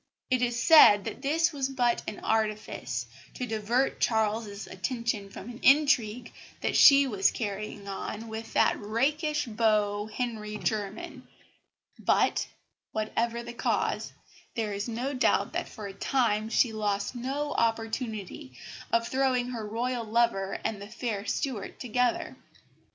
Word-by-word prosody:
It 255 -1 +3
is 240 -1 0
said 230 -10 +8
that - - -6
this 325 +4 +1
was 270 -2 -1
but 245 -3 +1
an 215 - -4
artifice 215 - -1 0.3
to 250 - -3
divert 230 +4 0
Charles's 215 -2 0
attention 230 -5 -3
from 195 - -10
an 240 0 -8
intrigue 250 -5 +3 0.3
that - - -1
she 280 -1 +8
was 205 -7 +2
carrying 205 -1 -5
on 210 +3 -5
with 220 0 -7
that - - +3
rakish 295 +8 0
beau, 215 -2 +1
Henry 215 -3 -4
Jermyn; 210 -1 -4 0.7
but, - - +2 0.5
whatever 230 +2 -1
the 235 0 -8
cause, - - -1 0.4
there 220 -3 -1
is 200 +2 -3
no 245 +4 -3
doubt 255 - +2
that - - -3
for 215 - -9
a 195 - -6
time 220 -1 0
she 230 0 +2
lost 205 -1 -1
no 275 +4 -3
opportunity 225 - -2 0.4
of 230 0 +2
throwing 260 -2 +1
her 225 -4 -5
Royal 240 +2 -2
lover 220 -3 +1
and 210 -2 -2
the 200 - -7
fair 220 -3 -4
Stuart 240 -4 -3
together. 245 0 0
230 Hz, 140 wpm, -28 LUFS, 210-250 Hz, 0.7 s, said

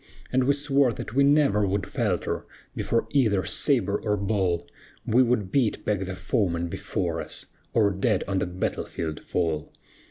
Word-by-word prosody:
And 130 0 +3
we 140 - +4
swore 140 -2 +2
that 105 - -7
we 140 +2 +4
never 140 -8 +4
would 100 0 -1
falter - - -2 0.3
Before 115 - 0
either 105 - +2
sabre 105 - +2
or 105 -1 0
ball; 95 -4 0 0.4
We 120 +4 +4
would 120 -6 +1
beat 125 -7 +1
back 100 -3 0
the 95 0 -5
foeman 85 -7 0
before - - -2
us, - - -6 0.3
Or 105 -3 +4
dead 95 +1 +1
on 95 -1 0
the - - -1
battle 90 +1 -2
field 80 -2 -4
fall. 80 -4 -1
105 Hz, 165 wpm, -26 LUFS, 95-125 Hz, 0.4 s, we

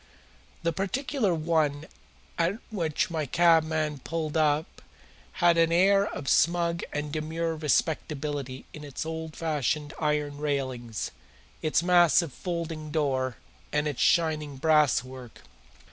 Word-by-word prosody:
The 170 0 +1
particular 210 - -1
one 155 -2 0 0.5
at 175 +5 +1
which 170 -6 -1
my 155 -3 -2
cabman 160 -2 +2
pulled 155 +2 -4
up 155 0 +1 0.5
had 170 -1 +3
an 165 0 +4
air 195 +4 +4
of 140 - -6
smug 170 +2 +2
and 150 0 -3
demure 160 +1 -2
respectability 145 -3 -1
in 150 - -9
its 145 +1 -5
old 160 -1 -5
fashioned 150 -2 -1
iron 150 -2 0
railings, 130 -6 -3 0.5
its 155 +1 +1
massive 175 -4 +4
folding 165 -3 -4
door, 135 -5 0 0.3
and 150 0 +1
its 145 -4 -3
shining 155 -4 +2
brasswork. 130 -5 +1
155 Hz, 115 wpm, -27 LUFS, 145-170 Hz, 0.5 s, an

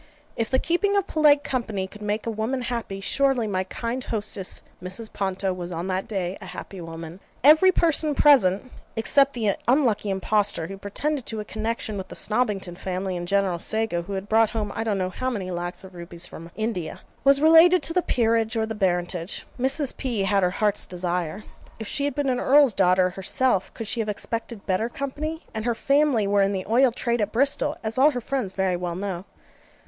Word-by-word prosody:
If 225 -1 -1
the 260 - +3
keeping 400 +7 +1
of 400 - +1
polite 295 -4 +4
company 220 -7 -2
could 210 +2 -12
make 210 +1 -2
a 230 - -1
woman 225 +4 -2
happy, 230 -5 -4
surely 270 +1 +1
my 190 -3 -1
kind 235 +6 -4
hostess 205 -3 -2 0.2
Mrs. 185 +5 -4
Ponto 190 -1 -1
was 180 -1 -6
on 170 +1 -4
that 185 +1 -2
day 190 -3 -3
a 190 - -9
happy 180 +1 -8
woman. 165 +1 -8 0.2
Every 310 +7 +7
person 315 -4 +1
present 255 -6 +4 0.2
(except 275 +5 +3
the 215 -5 0
unlucky 235 -6 +2
impostor 195 -2 +2
who 195 +3 -8
pretended 270 +7 -2
to 220 - -4
a 210 - -5
connexion 220 -1 -3
with 190 - -6
the - - -10
Snobbington 210 -6 -1
Family, 185 0 -3
and 175 0 -4
General 195 -2 +1
Sago, 220 -3 +1
who 190 +4 -7
had 195 +1 -4
brought 220 0 +4
home 215 -3 -3
I 225 - -2
don't 215 -3 0
know 185 -1 -2
how 255 +7 -2
many 195 -7 -4
lacs 175 +1 -4
of 190 0 -12
rupees 170 0 -6
from 165 -1 -10
India,) 215 -7 -3 0.2
was 275 0 +5
related 325 +4 +6
to 330 - 0
the 360 - +3
Peerage 225 -5 +1
or 220 - +1
the 220 - -4
Baronetage. 180 -2 -1 0.2
Mrs. 270 +2 0
P. 235 -7 -1
had 195 0 +2
her 180 - +3
heart's 210 +2 0
desire. 180 +1 -3 0.4
If 220 - -5
she 285 +4 -1
had 285 -2 -2
been 290 -1 -1
an 250 -1 0
Earl's 280 -3 +5
daughter 185 -1 +3
herself 195 +2 +1
could 225 - -5
she 230 - -1
have 215 -1 -1
expected 225 +1 -4
better 195 +4 0
company? 300 +5 -5
and 220 -1 -3
her 240 -1 +1
family 275 -3 +2
were 200 0 +2
in 195 +1 +2
the 185 -1 -3
oil 245 +4 +4
trade 235 0 -1
at 210 0 -1
Bristol, 275 +4 0
as 225 +3 -2
all 285 +3 +7
her 250 -5 -3
friends 240 -6 -3
very 190 -2 0
well 175 -1 -3
know. 190 -1 -4
215 Hz, 205 wpm, -24 LUFS, 190-255 Hz, 0.4 s, Every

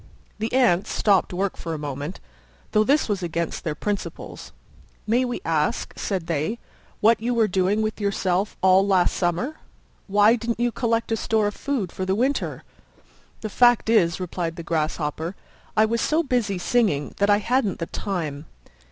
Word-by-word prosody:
The 220 +1 -2
Ants 240 -8 +3
stopped 200 -3 +2
work 190 +2 -1
for 165 -1 -5
a - - -4
moment, 145 +3 -5 0.5
though 215 - +4
this 285 +7 +2
was 205 -3 -1
against 170 -1 -3
their 155 -4 -2
principles. 205 +4 -5 0.5
"May 235 +4 +2
we 245 - -4
ask," 155 -2 0
said 190 -5 -3
they, 165 +7 -1 0.4
"what 225 +1 +4
you 240 +1 0
were 225 -2 +3
doing 190 +3 +1
with 215 0 -3
yourself 200 -1 0
all 190 +1 +5
last 185 -3 +3
summer? 185 - -1 0.5
Why 205 +3 +5
didn't 230 0 -3
you 240 0 +1
collect 230 -1 -1
a - - +3
store 220 -1 +1
of 205 - -1
food 245 -11 -2
for 185 - -4
the 190 +1 0
winter?" 260 +6 -1 0.8
"The 215 - -4
fact 240 -1 +4
is," 170 -6 +3
replied 175 -2 -3
the 170 - -7
Grasshopper, 160 +1 -2 0.4
"I 215 - +6
was 230 +1 0
so 315 +2 +2
busy 240 - 0
singing 180 - +1
that 200 +1 +2
I 205 - +6
hadn't 225 -2 0
the 165 - -3
time." 160 -7 -4
200 Hz, 170 wpm, -24 LUFS, 175-230 Hz, 0.8 s, I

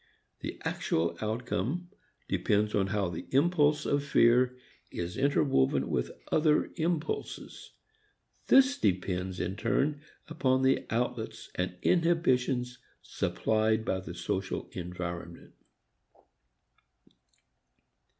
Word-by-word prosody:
The - - -6
actual 85 +1 0
outcome 120 - -2 0.4
depends 105 +1 +1
upon 100 -2 +2
how 100 -2 0
the 85 - -6
impulse 150 +1 +3
of 145 0 +1
fear 125 -2 +4 0.3
is 85 +3 -5
interwoven 135 - +2
with - - 0 0.2
other 155 -1 +3
impulses. 165 -1 -3 0.7
This 270 +1 +5
depends 90 - -1
in 90 +2 -2
turn 145 +5 0 0.3
upon 130 -5 +1
the 130 0 +2
outlets 115 0 -3
and 90 0 -2
inhibitions 130 -8 +2 0.2
supplied 110 0 0
by 95 - 0
the 90 -2 -8
social 95 +2 -3
environment. 85 -1 -6
120 Hz, 95 wpm, -30 LUFS, 95-145 Hz, 0.7 s, This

